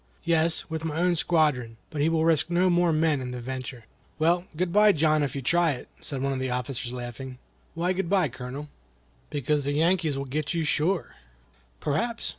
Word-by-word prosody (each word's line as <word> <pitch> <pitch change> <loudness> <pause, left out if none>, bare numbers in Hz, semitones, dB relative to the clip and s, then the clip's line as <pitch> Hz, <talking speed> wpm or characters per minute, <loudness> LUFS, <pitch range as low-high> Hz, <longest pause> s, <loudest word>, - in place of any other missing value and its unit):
"Yes, 165 -1 +1
with 160 -1 -4
my 160 -1 -2
own 180 0 +3
squadron, 145 -9 +1
but 150 -3 -2
he 155 - +3
will 160 -1 +2
risk 160 0 +3
no 180 +1 +3
more 175 -1 +3
men 155 -3 +2
in 125 - -4
the 125 0 -5
venture." 125 -1 -6 0.3
"Well, 170 +3 +2
good 175 0 -1
bye, 210 0 +6
John, 155 -1 +3
if 145 0 -1
you 135 - -4
try 170 +3 +3
it," 125 - -9
said 135 -3 -4
one 135 0 +1
of 130 - -3
the 130 0 -2
officers, 125 0 -3
laughing. 125 +1 -7 0.4
"Why 175 +3 +1
good 185 -2 -2
bye, 190 -4 +3
Colonel?" 130 +4 -7 0.6
"Because 145 +1 0
the 140 +1 -1
Yankees 160 -1 +2
will 140 - -3
get 150 +4 -2
you 165 - +1
sure." 160 +4 0 0.7
"Perhaps!" 230 - -1
155 Hz, 200 wpm, -27 LUFS, 130-170 Hz, 0.7 s, bye